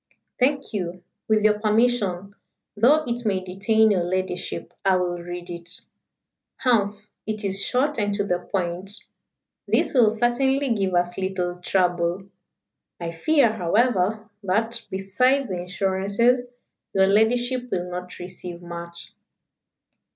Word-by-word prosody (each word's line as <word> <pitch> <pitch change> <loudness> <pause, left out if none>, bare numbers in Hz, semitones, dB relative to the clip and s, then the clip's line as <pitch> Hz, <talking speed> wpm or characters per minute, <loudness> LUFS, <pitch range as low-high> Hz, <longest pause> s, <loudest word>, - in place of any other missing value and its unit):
"Thank 275 0 +1
you. 180 -3 -4 0.2
With 215 -1 +3
your 210 0 +4
permission 210 -4 +1 0.4
though 275 +9 +5
it 240 0 -2
may 200 -4 +1
detain 215 +4 +2
your 185 -4 +2
ladyship 185 0 -3
I 195 -1 +4
will 175 -1 -1
read 175 +1 -7
it. 170 +1 -6 0.8
Humph! 210 -4 +1 0.2
it 215 -1 -3
is 195 0 0
short 280 +2 +1
and 205 -1 +1
to 205 - 0
the 180 -3 0
point. 180 +1 -3 0.7
This - - +1
will 240 -5 +6
certainly 245 +4 +1
give 195 -4 0
us 175 +1 0
little 185 -2 -2
trouble. 180 0 +1 0.8
I 170 -1 -4
fear, 260 - +3
however, 215 +1 +1
that, 225 +4 0
besides 220 +8 +1
the 180 -2 -2
insurances, 195 +6 +1 0.5
your 190 0 +5
ladyship 245 +5 +2
will 180 -4 -2
not 180 0 -6
receive 180 -1 -8
much." 170 0 -9
195 Hz, 130 wpm, -24 LUFS, 180-230 Hz, 0.8 s, will